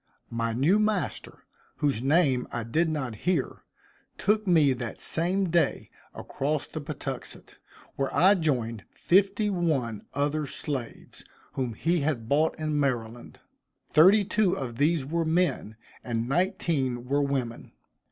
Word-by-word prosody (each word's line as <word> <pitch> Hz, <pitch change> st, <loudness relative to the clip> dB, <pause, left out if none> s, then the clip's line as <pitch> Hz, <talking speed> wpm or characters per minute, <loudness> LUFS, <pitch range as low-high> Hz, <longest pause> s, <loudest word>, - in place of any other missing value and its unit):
My 115 Hz, 0 st, -1 dB
new 145 Hz, -, +3 dB
master, 215 Hz, -3 st, -2 dB, 0.3 s
whose 140 Hz, -6 st, 0 dB
name 135 Hz, -2 st, +2 dB
I 120 Hz, -, -3 dB
did 160 Hz, +9 st, 0 dB
not 140 Hz, -7 st, -3 dB
hear, 165 Hz, -, -2 dB, 0.5 s
took 210 Hz, +1 st, +1 dB
me 155 Hz, -6 st, +4 dB
that 120 Hz, -2 st, -6 dB
same 185 Hz, +3 st, +1 dB
day 170 Hz, 0 st, 0 dB, 0.2 s
across 145 Hz, +1 st, -2 dB
the 155 Hz, -, -7 dB
Patuxent, 140 Hz, -3 st, -7 dB, 0.4 s
where 135 Hz, -1 st, 0 dB
I 185 Hz, +8 st, +5 dB
joined 125 Hz, -, -1 dB
fifty 200 Hz, +3 st, +2 dB
one 145 Hz, -, -1 dB
other 145 Hz, +1 st, 0 dB
slaves, 135 Hz, -4 st, -6 dB, 0.3 s
whom 125 Hz, -4 st, -3 dB
he 170 Hz, +6 st, +1 dB
had 140 Hz, -7 st, -2 dB
bought 150 Hz, +5 st, +2 dB
in 155 Hz, -1 st, -1 dB
Maryland. 120 Hz, -4 st, -3 dB, 0.5 s
Thirty 195 Hz, +7 st, +6 dB
two 210 Hz, -2 st, +1 dB
of 120 Hz, -4 st, -5 dB
these 150 Hz, -1 st, +2 dB
were 165 Hz, +4 st, -1 dB
men, 160 Hz, -, 0 dB, 0.3 s
and 115 Hz, -1 st, -2 dB
nineteen 140 Hz, -6 st, 0 dB
were 140 Hz, +2 st, +1 dB
women. 135 Hz, -4 st, -3 dB
145 Hz, 130 wpm, -27 LUFS, 125-170 Hz, 0.5 s, Thirty